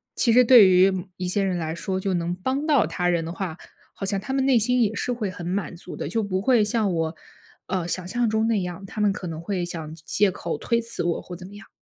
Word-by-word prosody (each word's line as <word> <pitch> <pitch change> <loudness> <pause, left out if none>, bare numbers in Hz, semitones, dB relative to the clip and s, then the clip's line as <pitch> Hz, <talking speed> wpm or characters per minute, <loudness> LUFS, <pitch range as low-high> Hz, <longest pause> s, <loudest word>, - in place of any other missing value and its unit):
其 230 -3 +3
实 250 +1 +7
对 230 -5 +8
于 185 +1 +5 0.3
一 180 -1 -3
些 195 +2 0
人 185 -2 0
来 160 0 -3
说， 185 +2 -3
就 195 0 -2
能 170 0 -1
帮 260 +10 -2
到 275 - +4
他 175 +2 -1
人 170 -2 +1
的 165 - -5
话， 180 -3 -5 0.4
好 - - -9
像 195 0 0
他 265 +7 -5
们 270 -1 +1
内 255 -3 +5
心 250 +3 +2
也 220 0 +1
是 245 - -1
会 215 -5 -3
很 175 -2 -8
满 185 -2 -2
足 175 +1 -9
的。 - - -4
就 225 -2 0
不 190 -1 -1
会 235 -1 +4
像 210 -2 +1
我， 160 0 -1 0.5
呃， 180 -3 -2
想 180 0 -3
象 240 +4 0
中 220 +1 +1
那 220 -4 +1
样， 180 +2 -6
他 215 - -8
们 205 -2 +3
可 185 -3 -6
能 160 -1 -5
会 180 0 -2
想 160 -3 -6
借 185 +5 +1
口 - - -4
推 235 -1 0
辞 230 -5 -2
我 170 -1 -1
或 180 - -9
怎 180 +1 -10
么 200 - -13
样。 200 - -13
195 Hz, 285 characters per minute, -24 LUFS, 175-225 Hz, 0.5 s, 对